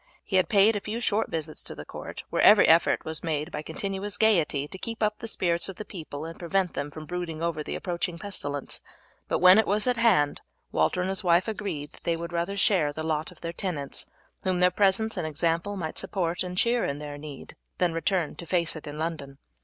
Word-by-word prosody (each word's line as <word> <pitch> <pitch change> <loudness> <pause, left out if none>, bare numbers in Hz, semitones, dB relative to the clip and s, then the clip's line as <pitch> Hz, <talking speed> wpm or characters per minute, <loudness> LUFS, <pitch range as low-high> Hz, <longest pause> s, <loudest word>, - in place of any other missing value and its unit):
He 190 - +1
had 185 - +3
paid 210 +1 +5
a - - 0
few 215 +3 -4
short 220 -2 +1
visits 155 -1 -3
to - - -5
the - - -8
court, - - -8
where - - +1
every - - +8
effort - - +4
was 160 0 -5
made 155 0 -2
by 150 - -4
continuous 195 +5 -4
gaiety 165 -10 +3
to 190 - -8
keep 230 +1 -4
up 210 0 +1
the 230 - -6
spirits 175 -4 +1
of 195 - -6
the 215 - -7
people 155 -5 -7
and 165 0 -8
prevent 180 +1 0
them 145 +1 -3
from 155 +1 -9
brooding 170 -2 -4
over 170 -2 -1
the - - -4
approaching 175 -1 -2
pestilence; 145 -7 -4 0.5
but - - +1
when 185 +3 +8
it 220 - +2
was 205 +2 +2
at 250 -1 +2
hand 190 -12 +3 0.3
Walter 180 - +2
and 185 - -1
his 195 +2 -2
wife 175 +2 +4
agreed 195 -9 -4
that - - -18
they 165 -1 0
would 170 +1 -6
rather 175 +4 -1
share 180 -7 +3
the 155 +2 -5
lot 155 -1 -1
of 180 - -18
their 170 0 -4
tenants, 165 -7 -4 0.3
whom 185 -2 0
their 180 0 +5
presence 205 +4 +2
and 155 - -1
example 165 +6 0
might 160 -4 -3
support 175 -3 -1
and 180 0 -3
cheer 235 +4 +2
in 140 - -1
their 145 -1 -7
need, 145 -2 -9 0.2
than 180 -3 +2
return 165 0 0
to 170 - -8
face 170 -2 +1
it 155 - -8
in 145 +1 -6
London. 155 -4 -4
175 Hz, 230 wpm, -27 LUFS, 155-195 Hz, 0.5 s, every